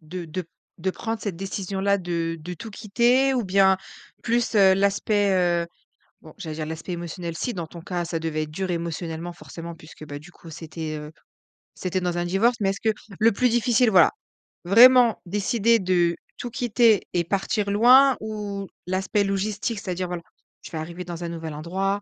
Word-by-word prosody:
de 170 +2 -7
de 170 +3 -5 0.3
de 190 +3 -1
prendre 225 +2 -4
cette 195 -5 -4
décision-là, 195 +1 -1
de 170 -2 -3
de 175 +3 -6
tout 220 +7 -9
quitter? 240 +6 +2
Ou 245 - 0
bien, 190 0 +4 0.5
plus, 235 0 0
heu, 195 -2 +6
l'aspect, 200 +1 +2 0.3
heu, - - -12 0.6
bon 155 -2 -14
j'allais 160 -5 -6
dire, 155 - -4
l'aspect 160 +3 -6
émotionnel, 170 0 -5
si 245 - -3
dans 170 -3 -4
ton 170 +1 -11
cas, 175 0 -3
ça 165 -1 -3
devait 155 -1 -2
être 150 - -11
dur 185 +4 -3
émotionnellement 170 0 -4
forcément, 170 0 -9
puisque, 155 -1 -13
bah, 145 0 -6
du 170 +4 -14
coup 165 - -14
c'était, 160 0 -6
heu, 150 +1 -9 0.6
c'était 185 0 -2
dans 175 -1 -1
un 175 - -1
divorce, 205 +7 +2
mais 195 -1 +1
est-ce 195 - -7
que - - +2 0.3
le 225 +1 +5
plus 250 +5 +2
difficile 240 0 +3
voilà, 180 -4 +6 0.5
vraiment 240 +3 +7
décider 210 +4 +2
de 175 -2 +2 0.2
tout 245 - -5
quitter 235 -4 +3
et 175 -1 +2
partir 200 +3 -1
loin? 255 +5 +6
Ou 205 -2 -5 0.2
l'aspect 190 +2 0
logistique, 200 +2 -2
c'est-à-dire, 180 -1 -3
voilà, 175 -1 -5 0.4
je - - -10
vais 160 - -5
arriver 170 +3 -6
dans 175 0 -6
un 170 - -3
nouvel 165 -2 -6
endroit, 190 +6 -2
190 Hz, 185 wpm, -24 LUFS, 170-210 Hz, 0.6 s, vraiment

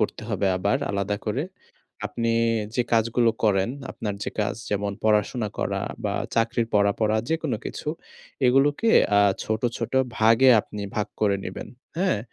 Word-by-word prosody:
করতে - - -1
হবে 100 - 0
আবার 100 +7 +1
আলাদা 100 +1 -1
করে। 120 +7 0 0.6
আপনি 115 -1 -2 0.5
যে 125 - +3
কাজগুলো 115 +1 +3
করেন, 95 -1 +3 0.2
আপনার 105 -2 -4
যে - - -3
কাজ 105 -1 0
যেমন 100 0 -1
পড়াশোনা 105 +1 +2
করা - - -1 0.2
বা - - -1 0.2
চাকরির 115 0 +1
পড়া, 100 0 +4
পড়া 110 0 +2
যেকোন 160 -3 -1
কিছু - - -6 0.6
এগুলোকে 140 - +3 0.3
আ - - +7 0.2
ছোট, 110 0 -2 0.2
ছোট - - -4 0.2
ভাগে 115 +4 +5
আপনি 105 -1 -8
ভাগ 105 - 0
করে 100 -2 +3
নিবেন। 95 - -6 0.3
হ্যাঁ। 185 - +1
110 Hz, 150 wpm, -25 LUFS, 105-120 Hz, 0.6 s, আ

